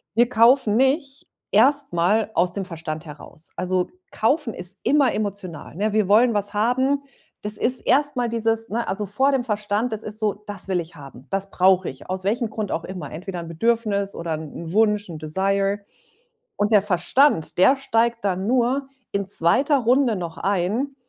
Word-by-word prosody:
Wir 240 +1 +4
kaufen 230 -2 +4
nicht 275 +4 0 0.2
erst 280 -5 +4
mal 205 +6 +1
aus 180 +1 +2
dem 195 -1 -2
Verstand 165 -2 -6
heraus. 155 +1 -10
Also, 185 0 -1 0.2
kaufen 250 +1 0
ist 180 +2 -3
immer 280 -3 +3
emotional, 195 -8 -4
ne? 210 +4 0
Wir 215 -3 +2
wollen 230 +4 +5
was 205 0 -1
haben, 260 +6 +1 0.4
das 210 0 -4
ist 250 +4 0
erst 290 0 +2
mal 245 -1 0
dieses 225 0 -1
ne, 235 +3 -2
also 205 +2 -2
vor 260 +8 +2
dem 270 -3 +1
Verstand, 210 +1 -1
das 220 - -5
ist 215 0 -5
so: 210 -2 +1
„Das 205 -2 -4
will 185 -2 0
ich 165 +1 -12
haben, 135 -4 -13
das 195 0 -2
brauche 185 0 +3
ich.“, 135 - -12
aus 185 0 -3
welchem 225 +2 0
Grund 215 -2 -4
auch 165 - -2
immer. 185 -1 -7
Entweder 180 +3 -6
'n 170 - -7
Bedürfnis 200 +2 0
oder 170 -1 -3
'n 160 +1 -7
Wunsch, 210 -2 +2
'n 160 - -7
Desire. 195 +5 0 0.8
Und 205 +2 0
der 205 - +6
Verstand, 190 - +2
der 260 +10 +5
steigt 235 -4 0
dann 190 +1 -1
nur 255 +2 +1 0.2
in 200 -1 -2
2. 255 - +2
Runde 250 0 +2
noch 170 -3 -6
ein, 205 +9 -1
205 Hz, 180 wpm, -22 LUFS, 185-235 Hz, 0.8 s, der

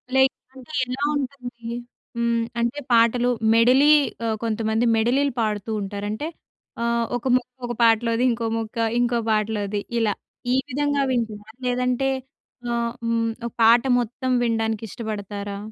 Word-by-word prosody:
Like 265 +1 +5 0.2
అంటే 265 +3 -13
ఎలా 255 +3 -4
ఉంటుంది? 250 -4 -6 0.5
హ్మ్. 235 0 +1 0.2
అంటే 235 +5 0
పాటలు 235 +2 +4 0.2
మెడలి 255 +6 +6 0.3
ఆహ్, 220 -1 0
కొంతమంది 220 +1 0
మెడలీలు 260 +4 +2
పాడుతూ 215 0 -2
ఉంటారు. 200 +1 -4
అంటే 290 +9 -3 0.6
ఆహ్, 235 0 +1
ఒక 245 - -12
ముక్క 250 -1 0 0.2
ఒక 240 - -3
పాటలోది, 230 +1 +3
ఇంకో 230 0 -2
మొక్క 225 0 -5 0.2
ఇంకో 240 -1 +2
పాటలోది 210 -1 0 0.2
ఇలా. 215 -3 +2 0.4
ఈ - - +3
విధంగా 285 +1 0
వింటునారా? 220 -3 -3
లేదంటే 250 +2 +1 0.6
ఆహ్, 235 0 0
హ్మ్, 230 0 +1 0.2
ఒక 235 - -3
పాట 230 +1 +7 0.2
మొత్తం 250 +2 -2
వినడానికి 225 -1 0
ఇష్టపడతారా? 205 -2 -5
235 Hz, 135 wpm, -23 LUFS, 220-250 Hz, 0.6 s, పాట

